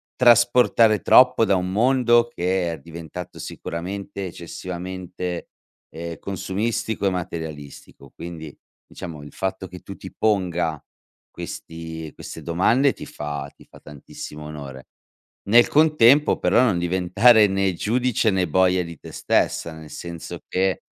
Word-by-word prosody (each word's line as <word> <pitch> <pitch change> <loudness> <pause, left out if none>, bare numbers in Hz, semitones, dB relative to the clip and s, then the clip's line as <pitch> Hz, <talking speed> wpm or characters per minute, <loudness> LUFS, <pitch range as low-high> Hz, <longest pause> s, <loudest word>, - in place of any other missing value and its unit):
trasportare 120 -2 +5
troppo 125 -2 +6
da 100 - +2
un 90 0 -1
mondo 120 +1 +3
che 90 -1 -1
è - - -8
diventato 85 +1 -9
sicuramente 95 +3 -6
eccessivamente, 90 +1 -6 0.4
ehm, 85 +1 -7
consumistico 100 +3 -3
e - - +2
materialistico, 80 -6 -7
quindi 80 -3 -9 0.3
diciamo 80 -5 -8
il 75 - -12
fatto 95 0 -3
che 90 0 -10
tu 100 - -9
ti 95 - -10
ponga 90 -7 0 0.5
questi 80 -1 -7
queste - - -9
domande 115 +11 +3
ti - - -10
fa 75 -1 -6
ti - - -18
fa - - -16
tantissimo 75 +1 -10
onore. 70 -3 -9 0.6
Nel 120 +2 +6
contempo 150 -2 +5
però 120 - +3
non 105 -9 +2
diventare 95 +6 +4
né 95 -1 0
giudice 115 +3 +1
né 95 -2 +1
boia 90 +2 +3
di 85 -2 -9
te - - -11
stessa, 85 - 0
nel 80 -1 -11
senso 85 -1 -7
che 95 0 0
90 Hz, 130 wpm, -23 LUFS, 85-110 Hz, 0.6 s, troppo